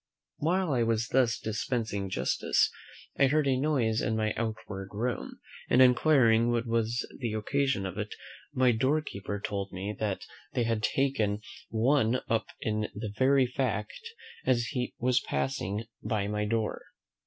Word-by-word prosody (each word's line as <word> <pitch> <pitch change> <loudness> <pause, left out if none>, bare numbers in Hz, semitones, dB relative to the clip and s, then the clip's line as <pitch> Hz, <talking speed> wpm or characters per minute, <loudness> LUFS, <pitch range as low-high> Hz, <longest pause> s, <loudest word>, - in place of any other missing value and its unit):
While 175 0 +1
I 125 - +2
was 115 0 +1
thus 125 -3 +3
dispensing 110 -2 -2
justice, 65 -7 +1 0.5
I 140 - +6
heard 150 +2 +2
a 135 -1 +3
noise 130 -6 +1
in 110 - 0
my 110 -1 0
outward 110 -4 -4
room; 120 +4 -3 0.3
and 125 - +4
inquiring 125 -3 +5
what 120 0 +1
was 115 +1 0
the 120 -4 -2
occasion 130 0 0
of 95 +1 -5
it, 105 0 -4 0.4
my 130 -1 +4
door 135 +7 +2
keeper 100 -5 -5
told 100 -1 -3
me, 100 +3 -4
that 105 -3 -2 0.3
they 125 -3 +1
had 115 -1 0
taken 110 -5 +1 0.3
one 120 +1 +2
up 115 -1 0
in 110 -1 -1
the 105 -1 -5
very 130 +3 +4
fact 125 -4 -2 0.4
as 120 -2 +2
he 125 -3 -3
was 125 +1 +2
passing 110 -7 -2 0.2
by 105 -2 -1
my 105 0 -1
door. 110 0 -1
115 Hz, 155 wpm, -29 LUFS, 105-130 Hz, 0.5 s, I